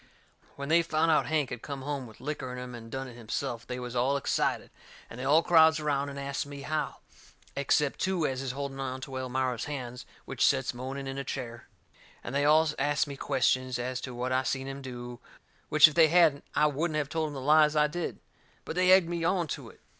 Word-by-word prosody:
When 140 +1 -6
they 170 +2 +5
found 165 0 +1
out 155 - +3
Hank 150 -4 0
had 125 -2 -5
come 140 -2 -6
home 140 -3 -4
with 110 - -15
licker 135 -2 -4
in 125 - -6
him 125 0 -7
and 115 -1 -9
done 135 +2 -5
it 125 - -10
himself, 120 +1 -4
they 125 0 -4
was 125 0 -6
all 130 +3 +2
excited, 140 - -1 0.4
and 120 - -9
they - - -4
all 150 +5 +4
crowds 160 -2 +5
around 145 -2 -1
and 140 - -8
asts 140 0 -2
me 145 0 -9
how, 155 0 -3 0.5
except 140 +1 +1
two 185 -4 0
as 130 -1 -2
is 130 -2 -3
holding 140 0 -5
onto 130 0 -5
Elmira's 130 -2 -2
hands 125 -4 -6 0.2
which - - -2
sets - - +2
moaning 130 +3 -5
in 135 0 -4
a - - -3
chair. 120 -4 -6 0.6
And 120 - -6
they 140 +1 +1
all 155 +2 +5
asts 145 +1 +2
me 140 -1 -7
questions 130 -1 +1
as 125 +1 -3
to 130 -2 -6
what 125 +1 -2
I 130 0 +2
seen 135 0 -2
him 135 0 -6
do, 120 -2 -8 0.5
which 155 0 +8
if 155 - -4
they 165 0 +6
hadn't 160 -3 +4
I 150 - +4
wouldn't 155 +2 0
have 150 -2 -1
told 160 0 -1
em 150 - -7
the - - -4
lies 150 +2 +4
I 150 0 +5
did. 165 +3 -4 0.5
But - - -5
they 185 0 +4
egged 185 -2 +6
me 170 -1 -3
on 175 0 +1
to - - -5
it. - - -19
140 Hz, 230 wpm, -29 LUFS, 130-155 Hz, 0.6 s, which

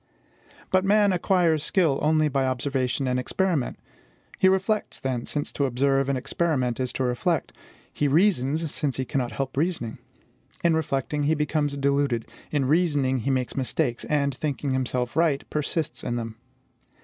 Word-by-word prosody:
But 185 0 +3
man 205 0 +4
acquires 175 -3 +2
skill 160 -6 +2
only 155 0 +3
by 135 -2 0
observation 130 0 -1
and 125 0 +1
experiment. 165 +1 -1 0.6
He 190 - +6
reflects, 195 +3 0
then, 130 -3 -2
since 145 -1 -2
to 140 - 0
observe 135 +1 +1
and 135 - +1
experiment 130 -4 -1
is 130 -1 -1
to 130 - -1
reflect; 125 -2 0 0.4
he 145 - +1
reasons, 155 -2 +2
since 145 -4 -1
he 130 - -1
cannot 125 -3 -2
help 135 0 -3
reasoning. 150 -7 -1 0.6
In 170 -1 +4
reflecting, 145 -1 -1
he 155 +2 +3
becomes 150 -1 0
deluded; 140 -4 +1 0.2
in 145 -3 0
reasoning, 145 -4 +2
he 130 - -2
makes 130 -2 -1
mistakes, 125 -2 -1
and, 140 -2 +1
thinking 140 +1 -2
himself 125 -1 -1
right, 160 -4 +1
persists 150 -4 -2
in 120 - -2
them. 115 -2 -4
140 Hz, 155 wpm, -25 LUFS, 130-160 Hz, 0.6 s, He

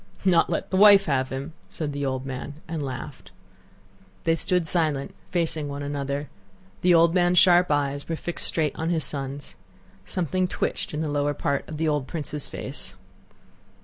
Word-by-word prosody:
"Not 180 -3 +4
let - - -2
the 190 - +1
wife 200 -1 +8
have 130 -4 0
him?" 135 +4 -5 0.2
said 150 -3 -4
the 140 0 -2
old 130 0 -2
man, 135 +2 -5
and 160 -1 -3
laughed. 130 -3 -6 0.9
They 165 - +3
stood 180 +1 +1
silent, 155 -5 0 0.2
facing 160 -4 -1
one 140 0 -5
another. 140 0 -3 0.5
The 180 -1 +5
old 165 0 +5
man's 180 -1 +3
sharp 180 0 +6
eyes 145 0 0
were 165 - 0
fixed 175 +2 -2
straight 155 -4 +1
on 160 +1 -2
his 165 -3 +1
son's. 140 0 -5 0.5
Something 185 +1 -1
twitched 165 - -2
in 150 - -2
the 160 - -1
lower 145 0 0
part 140 0 -1
of 155 - -5
the 160 +1 0
old 145 -3 0
prince's 150 -3 -4
face. - - -4
150 Hz, 175 wpm, -25 LUFS, 140-170 Hz, 0.9 s, wife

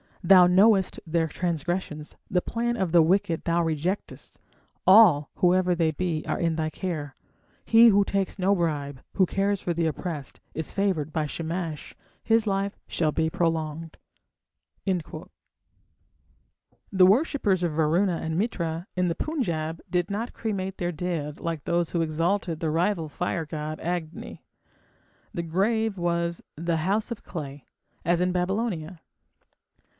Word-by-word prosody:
Thou 180 0 +7
knowest 195 +1 +4
their 165 0 +1
transgressions, 165 -1 -3
the 180 - +2
plan 235 +3 -2
of 190 -5 -1
the 170 0 +6
wicked 170 -1 +1
thou 170 0 +1
rejectest. 165 +5 -3 0.5
All, 185 -8 +7
whoever 180 0 +3
they 165 -2 +2
be, 160 -1 -2
are - - -1
in 165 -1 +1
thy 155 -1 -1
care.... 155 -6 -5 0.5
He 230 +1 +7
who 205 -2 +5
takes 195 0 -2
no 190 +2 +3
bribe, 145 -6 -2
who 190 - +4
cares 195 +2 0
for 175 - -1
the 165 0 0
oppressed, 155 -3 -5 0.2
Is 160 -1 -4
favoured 185 -7 0
by 155 -1 -1
Shamash, 165 0 -5 0.3
his 225 0 +3
life 195 0 -1
shall 155 -3 0
be 160 +1 0
prolonged. 160 -1 -2 0.9
The 185 -5 -3 1.8
worshippers 205 - +2
of 170 -3 0
Varuna 165 +4 +2
and 160 0 -3
Mitra 170 -5 -2
in 180 -1 +1
the 170 - -1
Punjab 170 - -2
did 175 +1 0
not 220 +4 -3
cremate 195 -4 -3
their 175 0 -1
dead 160 -3 -4
like 165 -3 -4
those 170 -2 0
who 170 - 0
exalted 165 +2 -1
the 160 -2 -1
rival 165 0 0
fire 165 +1 -2
god 155 0 -5
Agni. 170 -1 -5 0.9
The 170 - -3
grave 205 +5 0
was 170 -1 -1
the 165 +1 -1
"house 200 +8 0
of 235 - -6
clay", 145 -4 -7 0.4
as 170 +1 +2
in 180 0 +2
Babylonia. 180 -2 -2
175 Hz, 140 wpm, -26 LUFS, 160-190 Hz, 1.8 s, Thou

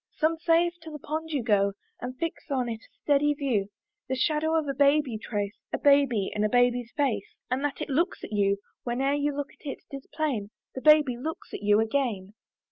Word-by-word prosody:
Some 320 +1 +1
say, 335 0 +4
if 345 - -3
to 325 - -9
the 305 - -7
pond 315 +3 -4
you 285 -6 -1
go, 200 -3 +3 0.3
And 255 +1 -5
fix 330 0 -4
on 260 -3 0
it 225 -1 -4
a - - -23
steady 295 0 +3
view, 245 -9 0 0.4
The 260 - 0
shadow 310 +4 +1
of 315 -2 +1
a 275 - -1
babe 285 +2 +4
you 230 -5 -5
trace, 205 -2 -3 0.2
A - - 0
baby 280 -8 +3
and 210 - 0
a 215 - +2
baby's 245 0 +2
face, 240 -9 -1 0.2
And 260 +2 0
that 290 -1 -2
it - - -2
looks 335 +7 0
at - - -7
you; 200 -1 +2 0.3
Whene'er 265 +3 0
you 290 0 0
look 285 0 -3
on 290 - -3
it, - - -17
'tis 275 -1 -8
plain 260 -10 -1 0.2
The 260 - -6
baby 300 -5 +5
looks 315 +6 -6
at - - -5
you 205 +1 +4
again. 220 -4 -1
275 Hz, 220 wpm, -27 LUFS, 225-300 Hz, 0.4 s, baby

